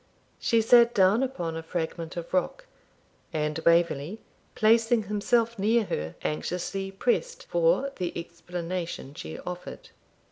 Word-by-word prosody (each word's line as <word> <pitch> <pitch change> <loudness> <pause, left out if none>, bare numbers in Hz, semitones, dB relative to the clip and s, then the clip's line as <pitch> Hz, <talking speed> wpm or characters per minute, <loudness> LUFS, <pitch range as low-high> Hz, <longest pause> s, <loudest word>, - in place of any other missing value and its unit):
She 230 -2 +3
sat 235 +1 +6
down 195 +4 +5
upon 180 -12 -2
a 165 - -4
fragment 165 0 -4
of 170 +1 -6
rock, 345 - 0 0.7
and 150 0 -1
Waverley, 170 +2 +2 0.4
placing 225 +1 +4
himself 225 +3 +1
near 225 +3 +3
her, 80 - -4
anxiously 180 +5 -2
pressed 485 - -1
for - - +2
the 180 -1 -2
explanation 170 -2 -5
she 80 - -7
offered. 180 0 -7
185 Hz, 120 wpm, -27 LUFS, 170-230 Hz, 0.7 s, sat